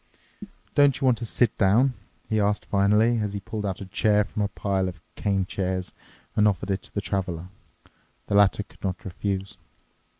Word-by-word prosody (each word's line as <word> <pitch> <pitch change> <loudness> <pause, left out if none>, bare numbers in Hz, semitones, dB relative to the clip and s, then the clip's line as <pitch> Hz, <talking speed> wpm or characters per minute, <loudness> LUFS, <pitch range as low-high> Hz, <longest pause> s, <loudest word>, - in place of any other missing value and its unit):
"Don't 145 -2 +4
you 135 - 0
want 125 -3 +3
to 115 - -4
sit 115 0 +2
down?" 115 +7 +4 0.3
he 110 - +1
asked 105 0 +1
finally, 105 +4 +3
as 105 -2 -2
he 100 - -3
pulled 105 +1 -4
out 95 0 -4
a - - -5
chair 105 +1 +2
from 105 - -5
a 100 - +2
pile 95 -2 -1
of 90 -2 -10 0.2
cane 100 -2 0
chairs 95 -1 -3 0.4
and 105 0 +5
offered 100 -1 0
it 95 - -1
to - - -19
the 100 - 0
Traveler. 90 -3 -3 0.8
The - - -4
latter 100 0 +4
could - - -23
not 95 -2 -3
refuse. 95 +1 -3
100 Hz, 190 wpm, -25 LUFS, 95-105 Hz, 0.8 s, and